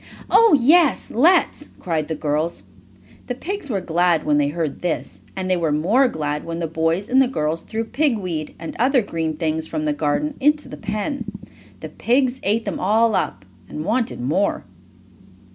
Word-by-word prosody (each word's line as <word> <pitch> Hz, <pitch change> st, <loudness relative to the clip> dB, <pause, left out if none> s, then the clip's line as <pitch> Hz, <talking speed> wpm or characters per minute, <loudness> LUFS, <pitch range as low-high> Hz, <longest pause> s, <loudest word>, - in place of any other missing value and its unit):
"Oh, 450 Hz, -9 st, +6 dB
yes, 300 Hz, +2 st, +4 dB
let's!" 305 Hz, +2 st, +3 dB
cried 160 Hz, -4 st, -2 dB
the 160 Hz, -, -3 dB
girls. 150 Hz, -, -2 dB, 0.6 s
The 250 Hz, -, -3 dB
pigs 365 Hz, +3 st, -5 dB
were 200 Hz, -5 st, -1 dB
glad 175 Hz, -1 st, +1 dB
when 150 Hz, -1 st, +2 dB
they 145 Hz, -, +2 dB
heard 155 Hz, -1 st, -3 dB
this, 175 Hz, -2 st, -3 dB
and 190 Hz, -1 st, -3 dB
they 185 Hz, -, +2 dB
were 165 Hz, -3 st, 0 dB
more 200 Hz, -, +3 dB
glad 150 Hz, -7 st, -3 dB
when 165 Hz, 0 st, -5 dB
the 170 Hz, -, -2 dB
boy 165 Hz, +1 st, 0 dB
and 265 Hz, +1 st, +4 dB
the 265 Hz, -, +3 dB
girls 160 Hz, -8 st, -2 dB
threw 225 Hz, 0 st, -4 dB
pig 265 Hz, +1 st, +1 dB
weed, 165 Hz, -6 st, -4 dB
and 165 Hz, -, -7 dB
other 255 Hz, 0 st, +3 dB
green 160 Hz, -4 st, -3 dB
things 160 Hz, -1 st, -1 dB
from 155 Hz, -1 st, -3 dB
the 150 Hz, -, +1 dB
garden, 155 Hz, -, -1 dB
into 295 Hz, +2 st, +2 dB
the -, -, -8 dB
pen. 215 Hz, +7 st, -4 dB, 0.6 s
The -, -, -6 dB
pigs 255 Hz, +1 st, +1 dB
ate 220 Hz, +3 st, 0 dB
them 200 Hz, -, -3 dB
all 220 Hz, +4 st, +3 dB
up, 95 Hz, -, -2 dB, 0.2 s
and 155 Hz, -, -5 dB
wanted 230 Hz, +3 st, -1 dB
more. 155 Hz, +11 st, 0 dB
185 Hz, 180 wpm, -21 LUFS, 160-250 Hz, 0.6 s, Oh